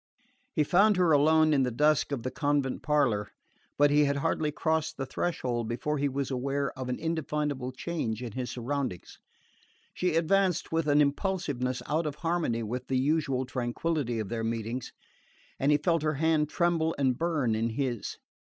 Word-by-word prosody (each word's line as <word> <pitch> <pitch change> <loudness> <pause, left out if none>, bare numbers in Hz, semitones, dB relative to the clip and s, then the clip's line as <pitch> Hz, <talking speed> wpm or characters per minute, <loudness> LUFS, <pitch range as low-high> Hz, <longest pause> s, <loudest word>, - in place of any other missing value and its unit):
He 155 - +3
found 195 +6 +4
her 180 -3 +3
alone 155 +1 +5
in 140 - +3
the 130 - +2
dusk 150 +5 +2
of 130 -5 -3
the 130 - -3
convent 145 -1 0
parlour; 130 -9 +1 0.5
but 145 0 +5
he 150 0 +5
had 140 0 +1
hardly 150 +2 0
crossed 160 +1 -1
the 135 - -3
threshold 125 -7 -2
before 150 +5 -2
he 145 0 +1
was 135 0 -3
aware 140 +2 -1
of 130 -1 -6
an 125 - -1
indefinable 150 -5 -2
change 125 -5 -3
in 120 - -5
his 125 +3 -4
surroundings. 130 -6 -4 0.7
She 180 -3 0
advanced 180 +1 +2
with 165 -1 0
an 145 0 +5
impulsiveness 140 -5 -1
out 155 +2 0
of 145 - -4
harmony 165 -9 -1
with 125 +4 -4
the 130 - 0
usual 135 -2 +1
tranquillity 125 +1 -2
of 110 -3 -3
their 115 -1 -2
meetings, 115 +2 -3 0.7
and 140 +2 +3
he 150 - +5
felt 165 +2 +1
her 155 0 0
hand 155 0 +2
tremble 165 -2 +1
and 130 -3 +2
burn 150 -6 0
in 115 +1 0
his. 120 -1 -3
145 Hz, 175 wpm, -29 LUFS, 125-160 Hz, 0.7 s, alone